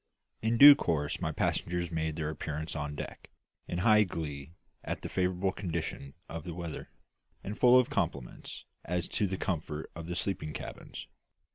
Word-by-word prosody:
In 115 +1 +1
due 145 +3 +12
course 75 - -1
my - - 0
passengers 85 0 -1
made 80 -1 -1
their 80 -1 -2
appearance 80 +1 -4
on 75 -1 -3
deck, - - -7 0.4
in 85 - -3
high 105 +3 +5
glee 80 -5 -4 0.3
at - - -4
the - - -4
favourable 95 +1 +1
condition 80 -7 -4
of 80 -1 -6
the 85 0 -6
weather, 85 -3 -6 0.5
and 105 - -4
full 125 +2 +7
of 125 - +3
compliments - - -3 0.2
as 90 +1 -1
to 105 - 0
the 95 0 -3
comfort 80 -4 -3
of 85 -1 -7
the 85 - -3
sleeping 90 -5 -2
cabins. - - -7
85 Hz, 165 wpm, -31 LUFS, 75-95 Hz, 0.5 s, due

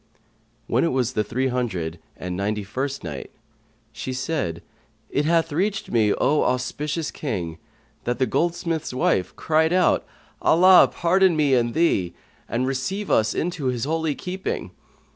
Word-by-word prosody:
When 120 - +1
it - - +3
was 130 -1 0
the 105 - +1
Three 130 +5 -1
hundred 95 -10 -2 0.2
and 90 0 -5
Ninety 105 +2 -1
first 135 +8 -4
Night, 75 -5 -6 0.6
She 115 +3 -5
said, 125 - -2 0.5
It 145 - +1
hath 165 0 +2
reached 195 +7 -1
me, 110 -3 +3
O 150 +1 +2
auspicious 150 +5 -1
King, 90 - -4 0.5
that 120 0 -1
the 130 - +2
goldsmith's 165 -3 -1
wife 95 -7 +1
cried 160 +1 +2
out, 180 0 +3 0.4
"Allah 185 +3 +7
pardon 185 +1 +3
me 150 -3 +2
and 120 -2 +2
thee, 100 - +1 0.3
and 125 +2 0
receive 160 +11 -2
us 110 -1 +2
into 165 -5 -2
his 125 -2 -1
holy 160 0 0
keeping!" 185 +1 -4
130 Hz, 145 wpm, -23 LUFS, 115-165 Hz, 0.6 s, Allah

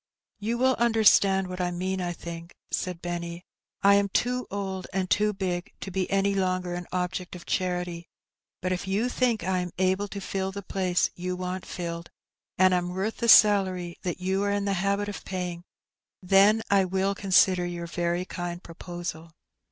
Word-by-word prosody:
^' - - -65 0.4
You 225 +3 -1
will 260 +1 +3
understand 210 -4 +4
what 185 0 -5
I 180 - +1
mean, 185 +2 -2
I 175 -1 -2
think, 170 0 -8 0.2
said 180 -2 -3
Benny. 170 0 -4 0.2
'' - - -42
I 200 0 +7
am 200 0 +3
too 250 +5 0
old 190 -2 -4
and 190 -1 -1
too 210 +2 +2
big 185 -1 -3
to 190 - -6
be 185 0 -1
any 195 0 +2
longer 185 -2 0
an 175 0 -5
object 180 0 -3
of 175 - -10
charity, 180 -2 -2 0.6
but 185 - 0
if 185 +1 -2
you 210 +6 +1
think 245 -6 +1
I 185 +1 0
am 180 0 -3
able 190 +2 +1
to 200 - -6
fill 190 0 -3
the 200 +1 -7
place 185 -1 0
you 180 +1 -4
want 185 0 -4
filled, 170 -1 -5 0.5
and 185 0 +5
am 180 0 0
worth 200 +4 -2
the 235 - 0
salary 185 -5 +5
that 180 0 -3
you 190 +2 0
are 200 0 +1
in 200 0 0
the 200 - +1
habit 200 +1 0
of 205 - -6
paying, 180 -2 -4 0.6
then 200 +4 +4
I 200 -1 +5
will 190 +1 0
consider 185 -2 +3
your 175 -1 -5
very 175 +1 -1
kind 175 -1 -5
proposal." 170 -1 -7
185 Hz, 190 wpm, -27 LUFS, 175-200 Hz, 0.6 s, I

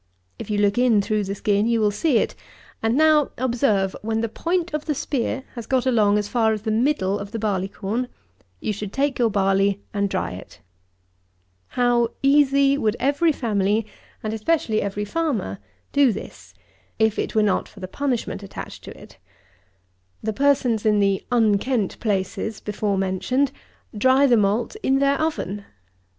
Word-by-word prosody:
If - - -7
you 210 - 0
look 205 +2 +2
in 245 -4 +4
through 210 0 0
the 195 +1 -3
skin, 205 +1 +1
you 235 -1 +2
will 210 -1 +2
see 270 +4 +1
it; - - 0 0.5
and 225 +3 +1
now 310 -2 +4
observe; 230 -6 +1
when 225 +1 -1
the 230 - 0
point 345 - -2
of 300 0 -3
the 300 - -1
spear 265 0 -2
has 235 -3 -7
got 260 -1 +1
along 215 -5 +3
as 205 -1 -1
far 220 0 +2
as 215 -1 -5
the 220 - -1
middle 220 -4 +1
of 200 - -6
the 225 - -5
barley 200 -4 -1
corn, 215 +5 -3 0.5
you 215 - -2
should 205 -1 -6
take 275 -1 0
your 235 -2 +3
barley 195 0 +2
and 200 -1 0
dry - - -2
it. 90 - -11 1.2
How 240 -1 +3 0.2
easy 280 0 +4
would 215 -3 +1
every 290 +5 +2
family, 210 -4 0 0.4
and 215 0 -2
especially 220 -1 0
every 205 +1 -3
farmer, 250 - -2 0.3
do 280 -3 +5
this, - - -9 0.4
if 220 -1 +2
it - - -3
were 215 - +4
not 205 - 0
for 205 - -15
the 185 - -6
punishment 250 -2 -2
attached 200 - -9
to - - -10
it! - - -16 1.0
The 220 0 -1
persons 255 -4 +2
in 210 -2 +3
the 195 -1 +1
"unkent 225 -1 +1
places" 205 +1 -2
before 205 -1 -2
mentioned, 195 +9 0 0.4
dry 260 +6 +4
the 250 -3 +5
malt 215 - +1
in 270 - +2
their 280 +1 +2
oven! 205 - -2
220 Hz, 170 wpm, -23 LUFS, 205-265 Hz, 1.2 s, do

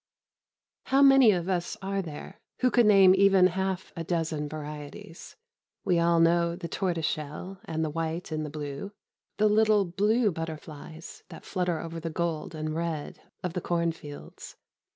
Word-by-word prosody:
How 275 +1 +4
many 270 -4 +7
of 180 -4 +1
us 180 -2 -2
are 195 0 -1
there 170 +4 -9 0.2
who 255 -1 +3
could 240 -3 +4
name 195 -3 +7
even 195 -1 +5
half 190 0 -1
a 165 - -4
dozen 160 -3 -2
varieties? 150 +1 -9 0.5
We 180 -3 +2
all 170 0 +3
know 170 0 +3
the 175 -1 -6
tortoiseshell 170 0 -3
and 160 -3 -2
the 155 - -3
white 165 +2 -3
and 155 0 -2
the 150 - -5
blue 145 +6 -6 0.4
the 215 - +3
little 210 -1 +4
blue 210 +5 +2
butterflies 160 0 -8
that 165 - -11
flutter 180 -4 -1
over 165 0 -6
the 165 0 -4
gold 165 -1 -3
and 155 0 -3
red 165 -3 -4 0.2
of 180 -2 -3
the 180 - -3
cornfields. 165 -4 -4
170 Hz, 155 wpm, -28 LUFS, 160-190 Hz, 0.5 s, many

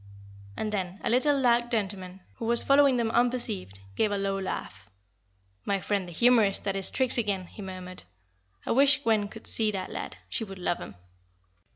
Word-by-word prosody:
And 215 - -3
then 190 -2 -4
a - - 0
little, 280 +3 +3
dark 240 -1 +2
gentleman, 195 -4 -3 0.2
who 230 - -5
was 235 +1 +4
following 275 -2 +4
them 230 -2 0
unperceived, 230 - 0
gave 210 - +1
a 205 - -1
low 195 0 -2
laugh. 100 - -6 0.7
"My 200 -1 -1
friend 195 -1 -2
the - - -9
humorist 220 +1 +3
at 195 - 0
his 195 -1 +4
tricks 255 -2 +2
again," 200 -4 -1
he 205 - -12
murmured. 185 - -4 0.6
"I - - -2
wish 275 +2 +4
Gwen 220 -4 +1
could 220 +2 -12
see 220 -1 +4
that 195 -3 -4
lad; - - -6
she 230 - -3
would 195 -3 -9
love 180 -1 -2
him." - - -9
205 Hz, 185 wpm, -27 LUFS, 190-240 Hz, 0.7 s, was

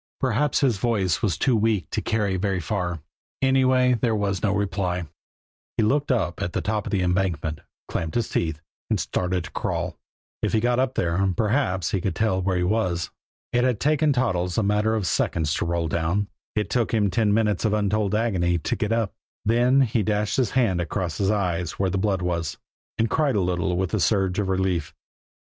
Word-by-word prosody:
Perhaps 130 +3 +1
his 125 -7 +2
voice 95 -6 0
was 95 -9 0
too 130 - +2
weak 105 -7 +1
to - - -1
carry 105 -4 0
very 95 0 0
far; 90 -2 -2 0.4
anyway, 130 -1 +3
there 115 -1 +1
was 100 -3 -1
no 100 - +2
reply. 95 -4 -1 0.7
He 115 - +3
looked 140 +6 +2
up 95 -9 0
at 85 - -2
the - - -1
top 105 -1 -2
of - - -4
the 95 -3 +1
embankment, 90 -4 0 0.3
clamped 80 -1 -3
his 120 - +1
teeth, 80 -2 -1 0.3
and - - +1
started 90 -1 -1
to - - -9
crawl. - - -3 0.4
If - - -1
he 110 - +4
got 120 +2 +1
up 130 0 0
there, 95 +3 +1
perhaps 105 - +1
he 95 - 0
could 95 - -2
tell 110 -4 +1
where 95 0 0
he 90 - +1
was. 90 -4 0 0.4
It 120 0 +3
had 125 -4 +1
taken 150 0 +2
Toddles 90 -10 0
a 110 - +3
matter 105 +2 +2
of 105 -4 -1
seconds 75 -1 0
to - - -1
roll 85 -1 0
down; 85 +6 0 0.3
it 105 -1 -1
took 120 -3 +1
him 105 -3 +2
ten 105 +2 +2
minutes 105 -2 +1
of 110 - +2
untold 105 0 +1
agony 95 -6 +1
to 80 - -2
get 105 0 -2
up. 115 -3 0 0.3
Then 120 +4 +4
he 115 -3 +2
dashed 105 0 0
his 125 -5 +2
hand 95 -9 +2
across 85 0 -3
his 95 -1 +2
eyes 90 -5 0
where 95 -1 -1
the 95 - 0
blood 95 -2 0
was, 85 -4 -2 0.4
and 115 - +2
cried 145 0 +1
a 100 - +2
little 90 0 0
with 95 -1 -1
the 110 - 0
surge 95 -1 +1
of 100 -2 -1
relief. 95 -4 -1
100 Hz, 205 wpm, -24 LUFS, 90-115 Hz, 0.7 s, he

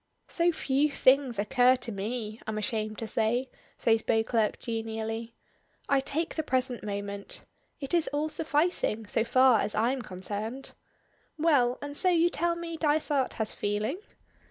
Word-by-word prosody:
"So 340 +1 +3
few 290 -2 +1
things 270 -3 +3
occur 250 +5 +4
to 240 -2 -5
me, 215 +2 -4
I'm 215 -1 -2
ashamed 215 -1 -2
to 225 - -4
say," 230 +4 0 0.3
says 225 -1 +2
Beauclerk, 225 0 +1
genially. 225 0 -4 0.5
"I 275 - +3
take 320 +5 -1
the 315 - -1
present 255 -4 0
moment. 200 -1 -4 0.3
It 275 +1 -5
is 340 -2 +3
all 295 +2 0
sufficing, 305 -8 0
so 220 - +1
far 255 -1 +5
as 210 - -1
I'm 245 +5 +1
concerned. 215 +6 -5 0.6
Well; 280 -6 +3
and 290 0 -6
so 370 - +4
you 345 -1 +4
tell 345 -1 0
me 335 -1 -5
Dysart 295 -3 +1
has 220 -2 0
feeling?" 210 - -2
245 Hz, 150 wpm, -28 LUFS, 220-290 Hz, 0.6 s, far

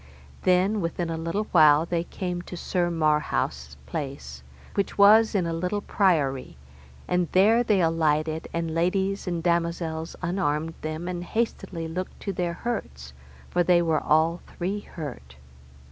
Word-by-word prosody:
Then 185 +3 +2
within 170 0 -2
a - - -2
little 165 +6 -2
while 155 -2 +6
they 170 0 -1
came 180 -1 -4
to 180 0 -9
Sir 175 0 0
Marhaus' 150 - 0
place, 65 - -6 0.3
which 200 - -2
was 215 +2 +6
in 185 -3 +2
a 165 - -2
little 180 +5 -2
priory, 150 - +1 0.5
and 180 -1 +1
there 215 +5 +5
they 210 -5 +2
alighted, 160 -1 +1
and 165 -1 -2
ladies 190 +4 0
and 170 -2 -2
damosels 170 -1 -1
unarmed 165 -3 -1
them, 155 +2 -4
and 175 -1 -3
hastily 180 -5 -3
looked 180 +3 -5
to 200 - -3
their 175 -1 -2
hurts, 70 - -5 0.4
for 175 - +2
they 175 0 +4
were 160 -2 +1
all 160 +3 +2 0.2
three 190 +4 -2
hurt. 125 - -9
170 Hz, 145 wpm, -26 LUFS, 155-185 Hz, 0.5 s, while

